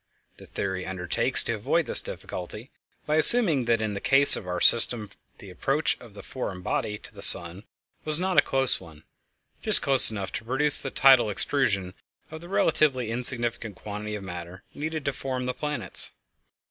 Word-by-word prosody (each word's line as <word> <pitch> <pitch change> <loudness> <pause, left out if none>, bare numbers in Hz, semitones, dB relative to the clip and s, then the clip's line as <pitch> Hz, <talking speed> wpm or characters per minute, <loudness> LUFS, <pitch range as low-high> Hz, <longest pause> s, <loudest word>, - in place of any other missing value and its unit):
The - - -16
theory 95 -1 -6
undertakes 90 -2 -1
to - - -3
avoid - - -2
this - - +1
difficulty 105 +7 -10 0.3
by 150 +1 -1
assuming 160 - +6
that 115 -1 -1
in 105 -1 -4
the 100 - -7
case 140 +1 +6
of 90 - -9
our 90 0 -5
system 115 -3 +3 0.3
the - - -14
approach - - -2
of - - -17
the - - -12
foreign 90 -1 -8
body 105 +3 -4
to - - -16
the - - -13
sun 85 +5 +6 0.4
was 155 +1 -2
not 185 0 -3
a - - +5
close 135 -1 +1
one—just 80 -4 -4
close 135 -2 +2
enough 100 -3 -7
to 100 - -7
produce 140 +4 +2
the 135 - -6
tidal 130 -5 +3
extrusion 100 -5 -2 0.4
of 160 0 -10
the 175 - -14
relatively 135 - -1
insignificant 120 -3 -1
quantity 105 +2 -8
of 105 - -9
matter 90 0 -10
needed 155 0 -7
to 140 - -2
form 130 -2 -6
the 125 - -4
planets. 145 - 0
120 Hz, 175 wpm, -24 LUFS, 100-140 Hz, 0.4 s, assuming